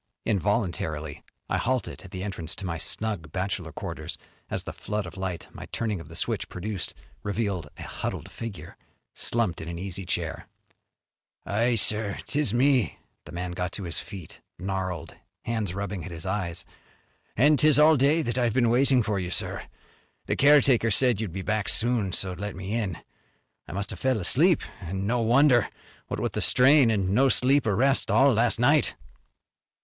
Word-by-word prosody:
Involuntarily 85 - -1 0.2
I - - 0
halted 130 0 -2
at 95 - -12
the 95 0 -6
entrance 85 -5 -4
to 100 - -7
my 85 -2 -3
snug 95 -5 -1
bachelor 95 -2 -3
quarters - - -6 0.3
as - - -3
the - - -6
flood 105 -1 -3
of 90 - -9
light 95 -3 -4
my - - -9
turning 110 -5 -2
of 85 - -10
the 80 - -11
switch - - -2
produced 95 0 -4 0.3
revealed 100 -6 -2
a - - -8
huddled - - -5
figure 115 -5 -8 0.4
slumped 115 -8 0
in 80 - -7
an 85 0 -5
easy 95 +1 -5
chair. 85 -3 -3 1.0
"Aye, 115 +4 +1
sir, 105 -1 +2
'tis 145 -6 0
me." 125 0 +2 0.3
The - - -11
man 90 +1 -4
got 90 0 -3
to 100 - -5
his 85 -2 -3
feet, 95 -6 -9 0.2
gnarled 95 -3 -4 0.3
hands 110 -6 -2
rubbing 100 -3 -4
at - - -7
his 85 -1 -7
eyes. 95 -3 -2 0.7
"An' 150 +6 +5
'tis 155 0 +5
all 155 +1 +7
day 145 +4 +3
that 120 -1 -1
I've 120 -3 +1
been 120 -2 +3
waiting 130 0 +4
for 105 -2 -1
you, 90 -1 -3
sir. - - -3 0.6
The - - 0
caretaker 135 -5 +5
said 120 -1 +3
you'd 105 -6 -3
be 95 +2 -5
back 110 0 0
soon 115 -4 +2
so 95 +1 -3
let 100 +2 -5
me 95 +3 -5
in. 105 -7 -1 0.7
I - - -8
must 100 +2 -3
have - - -7
fell 130 -4 +1
asleep, 160 - +3 0.2
an' 95 +2 -4
no 120 +4 +1
wonder, 120 +1 +4 0.4
what - - -4
with - - -2
the - - -1
strain 130 0 +6
an' 100 -3 +1
no 135 +5 +4
sleep 135 +1 +3
or 105 - +2
rest 135 +5 +2
all 135 0 +5
last 115 +1 +2
night." 145 +5 +3
105 Hz, 180 wpm, -26 LUFS, 90-125 Hz, 1.0 s, all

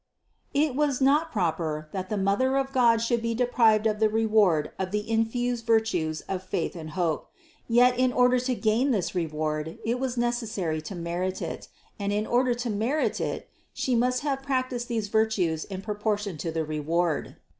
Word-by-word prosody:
It 290 -1 +2
was 290 -3 +1
not 295 +4 +3
proper, 160 -5 -1
that 185 -1 -4
the 210 - -1
Mother 200 +8 +2
of 270 0 -1
God 235 -3 +4
should 235 0 +1
be 230 0 -1
deprived 230 -3 +3
of 215 -1 +1
the 220 -1 +4
reward 210 -8 +2
of 190 -1 -1
the 210 +2 -2
infused 230 +1 0
virtues 180 -9 +1
of 190 -1 -4
faith 185 -2 -3
and 160 -2 -7
hope; 165 -4 -1 0.4
yet 245 +1 +4
in 255 0 +3
order 250 0 +4
to 250 0 -1
gain 230 +5 +1
this 200 -9 0
reward, 155 -2 -2
it 235 +2 0
was 260 -2 -2
neces 240 -1 0
sary 170 -8 -2
to 155 +5 -7
merit 175 +2 -3
it; - - -5 0.3
and 200 0 -1
in 210 +1 0
order 245 +1 +2
to 240 0 -3
merit 235 +9 0
it, - - -3 0.3
She 255 - 0
must 250 +1 +2
have 280 -2 -1
practiced 255 -3 -2
these 225 -3 -2
virtues 205 -7 +1
in 190 -1 -7
proportion 210 -2 -2
to 165 - -3
the 160 -1 -2
reward. 155 +2 -1
220 Hz, 185 wpm, -27 LUFS, 180-245 Hz, 0.4 s, God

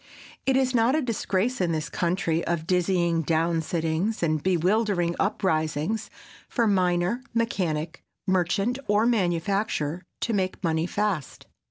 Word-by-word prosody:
It 265 -1 +4
is 260 -1 +2
not 240 +3 +3
a 310 - +2
disgrace 230 -1 -1
in 170 -2 +1
this 155 -1 -2
country 170 +1 0
of 170 -2 -1
dizzying 175 -2 +2
down 165 +1 +1
sittings 165 +5 -1
and 155 -2 +1
bewildering 185 0 +1
uprisings, 165 +1 0 0.4
for 235 - +1
miner, 185 +2 +1
mechanic, 170 -9 -1 0.2
merchant 195 +6 +1
or 210 +2 +3
manufacturer 180 -5 0 0.2
to 230 - 0
make 190 -2 -1
money 160 0 +1
fast. 205 -8 -2
180 Hz, 130 wpm, -26 LUFS, 165-210 Hz, 0.4 s, It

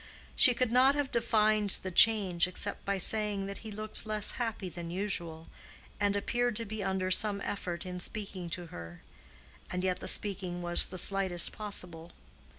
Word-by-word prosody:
She 250 -4 +7
could 250 -1 0
not 260 +3 +5
have 290 -2 -2
defined 215 -3 +1
the 185 - -4
change 190 -4 +5
except 195 +2 -2
by 200 0 -1
saying 205 0 -1
that 200 0 -7
he 220 - -9
looked 215 +1 -5
less 215 -1 -2
happy 225 -5 -4
than 175 -1 -7
usual, 170 -4 -3 0.5
and 205 -1 +1
appeared 240 +3 -1
to 230 - -2
be 215 0 -5
under 190 -1 -1
some 205 +1 +4
effort 180 -4 -4
in 180 0 -6
speaking 190 -2 -3
to 175 +1 -2
her. 85 0 -10 0.7
And 180 0 -3
yet 185 -1 -1
the - - -5
speaking 185 -3 -1
was 175 0 +1
the 185 - -8
slightest 190 -2 +3
possible. 175 -6 -2
200 Hz, 170 wpm, -30 LUFS, 180-215 Hz, 0.7 s, She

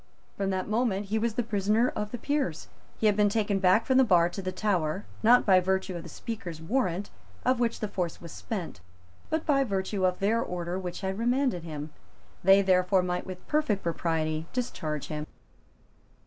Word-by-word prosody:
From 195 -1 -1
that 185 -1 -1
moment 215 -2 0
he 220 +1 +1
was 225 0 -1
the 245 - +1
prisoner 215 +2 +2
of 210 - -4
the 245 - -5
Peers. 270 - -2 0.3
He - - -1
had 210 -1 +5
been 205 0 +4
taken 205 -2 0
back 190 +4 +4
from 260 +1 +4
the - - +7
bar 175 -7 +4
to 175 +3 -6
the 185 0 -3
Tower, 185 -2 -1 0.2
not 240 +3 +6
by 190 -2 +6
virtue 190 0 -1
of 170 - -4
the 170 - -10
Speaker's 185 -4 -6
warrant, 190 0 -1 0.3
of 255 0 +3
which 235 -1 0
the 215 - 0
force 180 -4 -3
was 170 -2 -10
spent, 175 - -5 0.5
but 315 0 -1
by 275 -3 +3
virtue 195 -3 -2
of 180 -1 +2
their 220 +4 +1
order 175 +1 -3
which 180 +1 -5
had 190 +1 -3
remanded 245 -4 +1
him. 155 -2 -6 0.5
They, 195 +2 +6
therefore, 185 0 +3
might 180 0 -2
with 185 -1 -8
perfect 300 -10 +1
propriety 160 -2 -1
discharge 155 - -3
him. 150 0 -4
195 Hz, 190 wpm, -28 LUFS, 175-225 Hz, 0.5 s, the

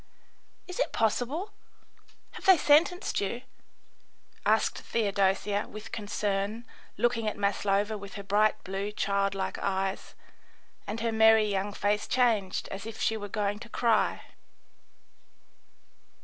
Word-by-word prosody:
"Is 365 +5 -7
it - - +1
possible? 255 - 0 0.8
Have - - -11
they 380 -2 +8
sentenced 315 - +3
you?" 235 +5 -3 1.0
asked - - +2
Theodosia, 200 -1 0
with 215 0 -9
concern, 205 +1 -2 0.3
looking 235 -2 +1
at 215 - -2
Maslova 205 +1 0
with 200 0 -10
her 200 - -6
bright 215 +2 +2
blue, 195 +2 -3
child 200 -1 0
like 190 -1 -3
eyes; 195 0 -2 0.7
and 215 +2 -4
her 230 0 0
merry 220 0 +6
young 200 0 -1
face 205 +1 0
changed 225 -7 +1
as 195 +3 -6
if 225 - -8
she 225 - +1
were 205 -2 -6
going 205 0 -1
to 235 - -11
cry. 230 -2 +1
210 Hz, 125 wpm, -29 LUFS, 200-230 Hz, 1.0 s, they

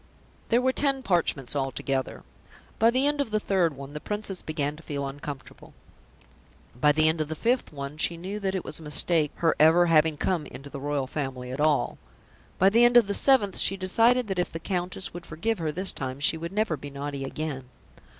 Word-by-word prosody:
There 240 +2 +3
were 260 0 +2
ten 275 -1 +1
parchments 165 - 0
altogether. 135 -1 -2 0.6
By 225 - +5
the 255 +3 +1
end 290 0 +1
of 280 - -3
the 215 0 0
third 180 -7 +1
one, 140 +1 -9
the 150 - -5
Princess 205 0 -4
began 150 -2 -3
to - - -12
feel 140 -3 -4
uncomfortable. 140 -1 -9 1.0
By 150 +5 +3
the 155 +1 +3
end 160 0 +1
of 155 - -2
the 160 - -4
fifth 240 +8 0
one 140 0 -7
she 170 - 0
knew 190 +5 -5
that 195 -1 -2
it 185 - -3
was 155 - -3
a - - -13
mistake 155 +1 +3
her 165 -1 +1
ever 165 +3 +6
having 160 -2 +3
come 170 -3 -1
into 140 +1 -11
the 140 - -6
Royal 145 -1 -2
Family 130 -3 -5
at 130 - -6
all. 150 -1 +1 0.6
By 190 +2 +4
the 230 +3 +5
end 240 0 +6
of 240 - +6
the 200 - -2
seventh 210 -6 +3
she 195 - +3
decided 230 +6 +2
that 190 -2 -2
if 180 - -1
the 165 - -5
Countess 185 +2 -4
would 175 0 -8
forgive 205 +7 -2
her 160 -2 -1
this 185 +5 +1
time 130 0 -5
she 150 - +2
would 170 +2 -6
never 210 -4 0
be 145 0 -9
naughty 140 0 -5
again. 135 -2 -5
165 Hz, 215 wpm, -26 LUFS, 145-195 Hz, 1.0 s, ever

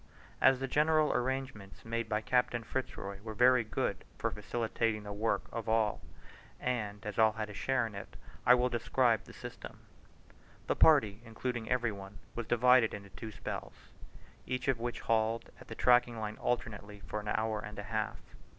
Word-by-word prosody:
As 130 0 +6
the 135 - -2
general 155 +2 +3
arrangements 125 -5 -3
made 115 0 -2
by 105 -1 +1
Captain 125 0 +1
Fitz 130 +4 -3
Roy 100 0 -6
were 110 0 -7
very 125 +1 +5
good 110 - -2
for - - -1
facilitating 110 +1 -1
the 105 0 -6
work 105 -1 0
of 115 -1 -4
all, 110 -2 +2 0.6
and 105 -4 -2
as 105 +1 -4
all 110 -1 +6
had 110 -1 -4
a - - -9
share 130 +3 +1
in 110 - -6
it, 100 - -8 0.3
I 125 - +7
will 125 0 +2
describe 120 -2 +1
the - - -12
system. - - -9 0.9
The - - 0
party 115 -10 +5
including 120 0 -4
every 120 -2 +1
one, 100 0 -9 0.2
was 115 -2 -4
divided 125 -1 +5
into 100 -1 -10
two 110 - -7
spells, - - -7 0.6
each 125 0 -2
of 130 -3 +2
which 120 +1 -3
hauled 115 0 0
at - - -14
the - - -7
tracking 120 -2 +4
line 110 0 -4
alternately 105 -4 -3
for 105 - -3
an 105 - -8
hour 110 0 0
and 105 0 -8
a 105 - -4
half. 110 +1 -2
115 Hz, 180 wpm, -32 LUFS, 105-125 Hz, 0.9 s, I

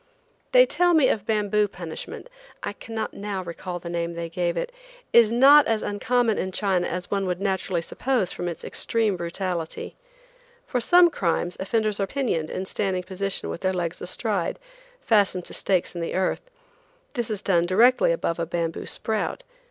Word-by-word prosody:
They - - +7
tell 355 -6 +3
me 290 -5 +5
bamboo 210 0 +1
punishment 175 - -8 0.4
(I - - -3
cannot 225 -1 -5
now 200 -2 -4
recall 175 +1 -6
the 175 - -9
name 170 0 -3
they 170 0 -4
gave 175 0 -1
it) - - -2 0.4
is 230 -2 +7
not 275 +5 +7
as 225 -1 0
uncommon 225 +2 +1
in 185 - -1
China 190 -2 0
as 180 0 -4
one 195 -1 0
would 180 -1 -2
naturally 190 -3 -1
suppose 245 -1 -1
from 175 - -4
its 170 - -5
extreme 220 -4 0
brutality. 170 -1 -4 0.7
For 250 - -1
some 350 +7 +6
crimes 175 - -1
offenders 215 +1 0
are 195 - 0
pinioned 205 - -1
in 190 - -4
standing 190 -2 -1
position 195 +1 -2
with - - -6
their 185 0 +1
legs 175 -1 -3
astride, 190 -1 -2 0.4
fastened 200 -5 +2
to - - -6
stakes 185 -3 0
in 175 - -5
the 165 - -3
earth. 185 0 0 0.7
This 240 -3 -2
is 210 -2 -3
done 175 -3 +2
directly 245 - +4
above 175 - -1
a 165 - -1
bamboo 165 -1 -3
sprout. 220 - -2
195 Hz, 170 wpm, -25 LUFS, 175-225 Hz, 0.7 s, They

